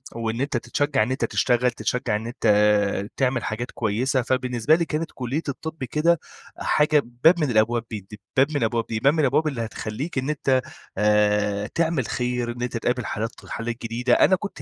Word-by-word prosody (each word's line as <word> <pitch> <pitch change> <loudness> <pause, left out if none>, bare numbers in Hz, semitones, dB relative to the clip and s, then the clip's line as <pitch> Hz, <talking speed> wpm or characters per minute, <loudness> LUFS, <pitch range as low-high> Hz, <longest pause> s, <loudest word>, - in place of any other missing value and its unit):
وإن 115 +1 -2
أنت 140 -3 0
تتشجع 135 +2 0
إن 125 - -3
أنت 130 - 0
تشتغل، 125 0 +2
تتشجع 125 -1 -1
إن 110 +2 -4
أنت 120 -1 -3 0.7
تعمل 130 -3 +1
حاجات 120 +3 -4
كويسة، 125 +4 0
فبالنسبة 125 +3 +1
لي 170 -1 0
كانت 160 +1 -3
كُلِّية 130 +5 -3
الطِب 160 +1 -6
كده 155 +5 +2 0.4
حاجة 150 0 +3 0.2
باب 170 +1 +6
من 150 -4 +1
الأبواب 115 +2 +2
ب 110 - -3 0.2
د - - -7 0.2
باب 135 - +6
من 140 - +1
أبواب 115 0 0
دي، 110 -1 -1
باب 140 +4 +4
من 160 - -1
الأبواب 150 +2 +2
اللي 135 -6 -2
هتخلّيك 115 +8 -5
إن 130 +3 -1
أنت 135 -3 +1 0.4
آآ، 105 0 +2
تعمل 165 -6 0
خير، 125 -1 -2
إن 120 +1 -8
أنت 125 -1 -2
تقابل 120 +1 -1
حالات 115 +1 -2
ط - - -15
حالات 115 0 -4
جديدة. 120 +2 0
أنا 190 - +5
كنت 200 +1 -7
125 Hz, 195 wpm, -24 LUFS, 115-145 Hz, 0.7 s, باب